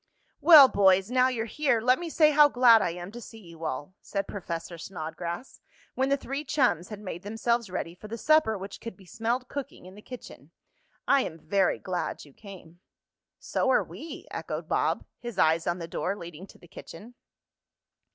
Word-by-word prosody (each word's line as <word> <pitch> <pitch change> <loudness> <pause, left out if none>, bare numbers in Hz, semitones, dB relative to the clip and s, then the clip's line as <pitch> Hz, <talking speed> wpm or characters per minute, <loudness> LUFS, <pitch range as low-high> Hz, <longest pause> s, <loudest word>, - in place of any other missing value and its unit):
"Well, 305 -6 +9
boys, 195 -1 +3
now 255 0 +4
you're 235 -3 -2
here, 270 0 +1
let 250 +3 +3
me 345 -1 -5
say 305 -1 +4
how 295 0 +6
glad 245 -4 +6
I - - 0
am 175 +2 -7
to 240 +2 -9
see 225 - -11
you 170 -5 -11
all," 145 +3 -4
said 195 -1 -4
Professor 170 -3 -6
Snodgrass, 170 +5 -6 0.3
when 265 +1 0
the 280 - +2
three 275 +2 -5
chums 250 - +1
had 210 -2 -7
made 185 -4 -7
themselves 225 +2 -1
ready 180 -2 -4
for 185 +4 -12
the 230 +2 -6
supper 310 -6 +3
which 195 +1 -9
could 230 -6 -8
be 190 - -17
smelled 230 +8 -2
cooking 280 -10 -7
in 185 - -12
the 205 - -13
kitchen. 250 +2 -11 0.6
"I 280 -1 +5
am 165 -9 -5
very 190 +4 +1
glad 180 -4 -4
you 145 - -18
came." 180 -4 -13 0.6
"So - - -1
are - - +4
we," 325 - -9
echoed - - -5
Bob, - - 0
his 240 -5 -7
eyes 160 -1 +2
on 175 - 0
the 165 -2 -6
door 180 +3 -2
leading 170 0 -10
to - - -17
the 175 - -18
kitchen. 205 +8 -12
205 Hz, 190 wpm, -27 LUFS, 175-250 Hz, 0.6 s, Well